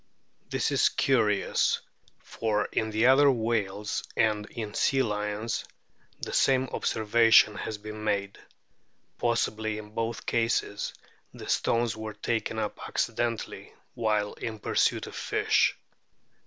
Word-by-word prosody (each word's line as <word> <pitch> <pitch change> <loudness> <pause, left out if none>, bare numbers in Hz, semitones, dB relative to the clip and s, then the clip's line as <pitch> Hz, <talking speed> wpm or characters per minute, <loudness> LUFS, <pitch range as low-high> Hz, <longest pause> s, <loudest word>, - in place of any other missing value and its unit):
This - - 0
is - - +4
curious, 110 -7 +2 0.4
for 105 -2 -2
in 110 +1 0
other 135 +3 +6
whales 105 -5 -1
and 105 -1 +2
in 110 -3 -6
sea 135 -1 +2
lions 105 0 -2 0.6
the - - -4
same 130 -1 +3
observation 115 0 +4
has 105 +1 -5
been 105 +1 -8
made; 100 -2 -1 0.8
possibly 110 -2 0
in 105 0 -9
both 115 0 -3
cases 115 -3 0 0.4
the - - -9
stones 115 -1 +1
were 110 0 -6
taken 110 +1 -2
up 105 -1 -3
accidentally 115 -1 -2 0.2
while 105 -3 0
in 110 -2 -5
pursuit - - +1
of - - -10
fish. - - +1
110 Hz, 115 wpm, -28 LUFS, 105-115 Hz, 0.8 s, other